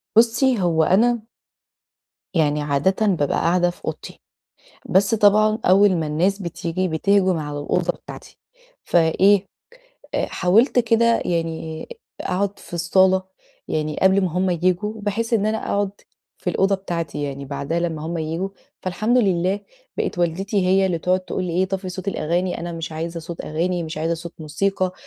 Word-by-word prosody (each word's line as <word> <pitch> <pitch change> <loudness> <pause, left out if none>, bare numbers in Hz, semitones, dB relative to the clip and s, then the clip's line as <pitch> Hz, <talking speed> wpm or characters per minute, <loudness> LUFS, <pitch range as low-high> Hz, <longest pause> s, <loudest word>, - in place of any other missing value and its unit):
بُصّي، 235 +2 +4
هو 165 -3 +2
أنا 225 +6 +2 1.1
يعني 150 -3 +2
عادةً 150 +9 +1
بابقى 165 -8 +1
قاعدة 175 +1 +2
في 175 - -11
أوضتي، - - -6 0.7
بس 200 +4 +3
طبعًا 215 0 +4
أول 190 +1 +5
ما 160 -2 -1
الناس 175 +7 +1
بتيجي، 170 +1 -2
بتهجُم 185 +2 +2
على 150 -1 -4
الأوضة 175 +4 0
بتاعتي، - - -12 0.5
فإيه 185 +4 +3 0.7
آآ - - +1
حاولت 220 +9 +3
كده 230 0 +3
يعني 165 -2 -3 0.3
أقعد 200 +2 -1
في - - -10
الصالة، 185 +2 +3 0.5
يعني 155 -1 -2
قبل 190 +1 +5
ما 185 -2 0
هُم 185 +2 +1
ييجوا، 180 +4 0
بحيث 225 +3 -2
إن 210 -2 +2
أنا 220 +1 0
أقعد 200 -1 0 0.5
في - - -2
الأوضة 195 +1 +2
بتاعتي، 170 -6 -4
يعني 140 -1 -4
بعدها 140 +4 -3
لمّا 160 -3 -3
هُم 170 +1 -3
ييجوا، 165 +4 -2 0.3
فالحمد 215 +7 +1
لله، 190 -2 +1 0.4
بقت - - -2
والدتي 185 +3 0
هي 190 +1 +4
اللي 175 -3 -1
تقعد 180 +3 +1
تقول 185 0 -4
لي 175 - -3
إيه: 180 +3 +2
"طفي 190 0 -4
صوت 185 +2 -5
الأغاني، 175 0 -1
أنا 175 0 -4
مش 165 -1 -5
عايزة 165 +2 -4
صوت 165 +1 -7
أغاني، 175 +3 -1
مش 160 -1 -6
عايزة 165 +2 0
صوت 170 +1 -9
موسيقى، 185 +4 -1
180 Hz, 160 wpm, -22 LUFS, 165-200 Hz, 1.1 s, أول